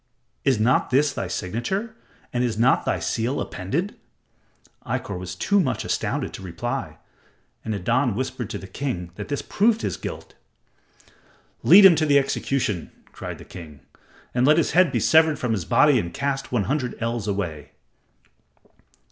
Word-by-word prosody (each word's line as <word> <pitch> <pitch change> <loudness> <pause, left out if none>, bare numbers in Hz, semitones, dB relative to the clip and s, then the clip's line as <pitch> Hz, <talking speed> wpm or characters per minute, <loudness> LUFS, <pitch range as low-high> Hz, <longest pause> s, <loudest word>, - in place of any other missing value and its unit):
Is 130 -5 +2
not 120 +4 +2
this 140 +2 +2
thy 95 - -3
signature, 120 - -3 0.4
and 120 0 +1
is 115 -3 -1
not 120 +3 +3
thy - - +1
seal 115 +10 -1
appended?" 145 - -3 0.8
Ikkor - - -3
was 90 0 -6
too 200 - +2
much 130 - -1
astounded - - -2
to - - -8
reply, 90 -3 -4 0.7
and 110 - -4
Nadan 115 +5 +1
whispered 130 -2 -4
to - - -4
the - - -9
king 95 -7 -4
that 105 +2 -7
this 145 - -3
proved 220 +2 +1
his - - -2
guilt. - - -7 1.3
"Lead 200 0 +8
him 190 - +10
to 155 - +1
the 145 -1 +5
execution," 135 - -1 0.2
cried - - -7
the - - -13
king, 75 -6 -11 0.5
"and 125 +2 +2
let 155 +2 +6
his 170 - +2
head 175 -2 +4
be - - 0
severed 160 -1 +4
from 125 - -2
his 100 -7 -1
body 135 - +4
and 85 -4 -4
cast 140 -1 -2
one 120 -5 +1
hundred 130 0 -2
ells 115 -2 -2
away." 90 -7 -4
125 Hz, 165 wpm, -23 LUFS, 100-145 Hz, 1.3 s, him